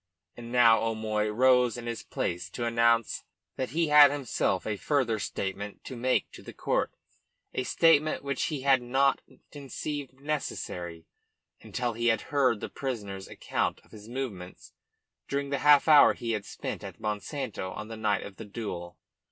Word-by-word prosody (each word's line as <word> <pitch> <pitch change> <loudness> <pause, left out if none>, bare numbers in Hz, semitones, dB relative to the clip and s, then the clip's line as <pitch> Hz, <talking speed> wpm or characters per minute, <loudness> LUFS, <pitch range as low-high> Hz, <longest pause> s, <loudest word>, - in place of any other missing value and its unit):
And 120 0 -9
now 120 -2 +6
O'Moy 110 -1 -1
rose 125 +1 +4
in 120 - -7
his 115 -1 -4
place 90 0 -3
to 120 - -4
announce 115 -1 +2 0.3
that 130 - -3
he 160 +2 0
had 150 -1 +9
himself 130 -9 -1
a 105 - -1
further 120 -1 0
statement 100 +1 -4
to, 130 - -7
make 125 +2 0
to - - -12
the - - -10
court, - - 0 0.6
a - - -1
statement 155 +3 +3
which 140 -2 -1
he 150 -4 -3
had 135 -1 +4
not 135 +3 +2 0.3
conceived 140 -1 -6
necessary 90 - -4 0.6
until 120 -2 -3
he 120 +1 -1
had 115 -1 +3
heard 130 -6 +3
the - - -3
prisoner's 105 -8 -5
account - - -2
of - - -26
his 105 0 -12
movements 115 -9 -6 0.5
during 140 0 -2
the 140 - 0
half 145 0 +6
hour 150 -2 +7
he 115 - -3
had 105 -2 -2
spent - - -6
at - - -9
Monsanto 105 0 -4
on 105 +3 -7
the 115 - -7
night 110 -2 0
of 100 - -10
the 110 - -8
duel. 100 -5 -6
120 Hz, 170 wpm, -28 LUFS, 105-140 Hz, 0.6 s, had